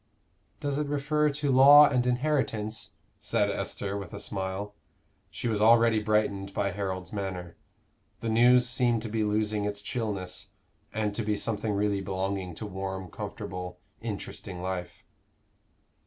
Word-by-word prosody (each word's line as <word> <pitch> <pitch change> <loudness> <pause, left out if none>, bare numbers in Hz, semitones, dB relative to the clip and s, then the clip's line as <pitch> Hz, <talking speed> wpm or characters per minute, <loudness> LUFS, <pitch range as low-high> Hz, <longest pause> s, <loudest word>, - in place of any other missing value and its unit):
"Does 145 0 -1
it 150 - -1
refer 150 +1 +1
to 145 -1 -1
law 140 +3 +9
and 125 -3 +1
inheritance?" 120 -6 -1 0.3
said 105 0 +1
Esther, 100 0 -3
with 100 -4 -6
a - - -6
smile. 100 0 -4 0.6
She - - -4
was 110 -2 0
already 115 0 +5
brightened 105 -2 0
by 100 -1 0
Harold's 95 -1 -4
manner. 95 -4 -4 0.6
The 115 - -3
news 125 +2 +5
seemed 120 -3 +1
to 115 - -4
be 110 0 0
losing 105 0 0
its 100 0 -2
chillness, 105 -4 -4 0.4
and 105 -1 -1
to 115 - -2
be 105 -1 0
something 105 0 -1
really 100 -1 +1
belonging 95 -1 -3
to 110 - -6
warm, 95 -2 -5
comfortable, 90 -1 -6 0.2
interesting 90 -2 -5
life. 90 -1 -4
105 Hz, 140 wpm, -28 LUFS, 95-120 Hz, 0.6 s, law